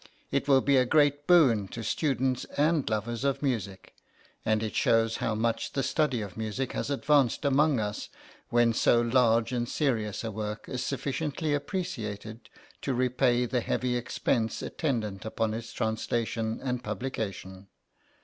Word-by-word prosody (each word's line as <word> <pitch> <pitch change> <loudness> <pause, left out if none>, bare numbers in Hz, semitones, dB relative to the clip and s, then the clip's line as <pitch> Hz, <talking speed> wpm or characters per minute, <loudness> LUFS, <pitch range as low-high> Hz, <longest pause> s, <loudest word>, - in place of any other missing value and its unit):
It 140 - 0
will 135 -2 +5
be 140 0 +3
a 130 - +5
great 145 0 +3
boon 130 - +5
to 115 +4 -7
students 130 0 0
and 150 0 +2
lovers 110 +3 -2
of 140 +1 0
music, 100 -8 -3 0.5
and 110 0 +1
it 110 - -3
shows 115 -1 +2
how 110 - -1
much 115 +1 -1
the 135 - 0
study 140 -2 +1
of 100 -3 -7
music 110 +4 -3
has - - -3
advanced 140 -1 +2
among 140 -1 +3
us 105 -1 -3 0.4
when 120 -1 +3
so 120 - +4
large 120 -1 +3
and 120 -1 -1
serious 110 -9 -1
a 115 - -3
work 105 0 -5
is 125 - -3
sufficiently 145 +2 -2
appreciated 115 - -4 0.3
to 135 - -1
repay 125 0 +2
the 125 0 -1
heavy 125 +1 -1
expense 115 -1 -1
attendant 110 - -2 0.2
on 110 -1 +1
its 115 0 -6
translation 110 0 -2
and 125 -2 -2
publication. 100 -4 -5
120 Hz, 150 wpm, -28 LUFS, 110-135 Hz, 0.5 s, will